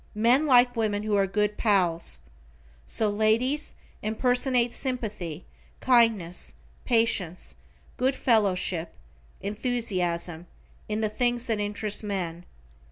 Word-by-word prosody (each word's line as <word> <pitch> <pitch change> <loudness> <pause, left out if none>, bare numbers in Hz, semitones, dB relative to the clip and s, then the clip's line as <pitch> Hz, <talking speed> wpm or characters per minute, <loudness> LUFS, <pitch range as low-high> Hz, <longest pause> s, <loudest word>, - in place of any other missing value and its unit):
Men 245 +7 +3
like 245 -2 +5
women 210 -2 -1
who 215 -1 0
are 195 -1 +2
good 210 +1 0
pals. 175 - 0 0.7
So 220 - +3
ladies 220 +8 +1 0.3
impersonate 245 +2 +1
sympathy, 210 - -4 0.3
kindness, 225 -9 +2 0.3
patience, 225 -7 0 0.4
good 265 +2 +1
fellowship, 190 -8 +1 0.5
enthusiasm, 185 -6 -2 0.4
in 215 +1 -1
the 215 - +1
things 240 +2 0
that 225 -4 0
interest 205 +1 -1
men. 180 -4 -4
215 Hz, 100 wpm, -26 LUFS, 190-240 Hz, 0.7 s, like